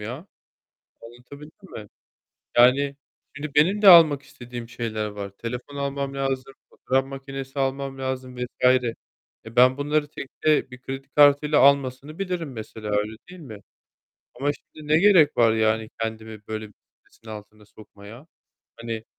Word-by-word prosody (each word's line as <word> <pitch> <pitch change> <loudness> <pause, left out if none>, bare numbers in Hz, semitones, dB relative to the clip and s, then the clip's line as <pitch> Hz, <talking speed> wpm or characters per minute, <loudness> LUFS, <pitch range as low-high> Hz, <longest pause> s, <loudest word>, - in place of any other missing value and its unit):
ya, 125 - -7 0.8
anlatabildim 140 - -14
mi? 105 -1 -9 0.7
Yani, 135 +3 +4 0.4
şimdi 145 0 -6
benim 185 +8 +3
de 205 - +7
almak 160 -6 +8
istediğim 120 -2 -10
şeyler 115 -3 -4
var. 100 -1 -7
Telefon 125 +7 -7
almam 140 0 -3
lazım, 135 -1 -3 0.2
fotoğraf 135 +1 -1
makinesi 135 0 -8
almam 135 0 -2
lazım 130 -1 -5
vs. 125 0 -3 1.0
E, 110 - -12
ben 130 +2 +6
bunları 145 +1 -1
tekte 150 0 -1
bir 125 0 -12
kredi 135 +1 -7
kartıyla 145 +1 +4
almasını 140 +2 +2
bilirim 180 -6 -4
mesela, 110 -2 -8
öyle 105 +1 -1
değil 180 -1 -12
mi? 120 -8 -10 0.8
Ama 140 +2 0
işte 145 - -5 0.2
ne 155 +1 +3
gerek 180 -6 +5
var 115 -2 +4
yani 110 0 0
kendimi 110 -1 -6
böyle 110 0 -5
bir 105 - -21 0.3
stresin 115 - -22
altına 105 0 -11
sokmaya? 105 +5 -15 0.5
Hani 115 -1 -6
130 Hz, 140 wpm, -24 LUFS, 115-145 Hz, 1.0 s, almak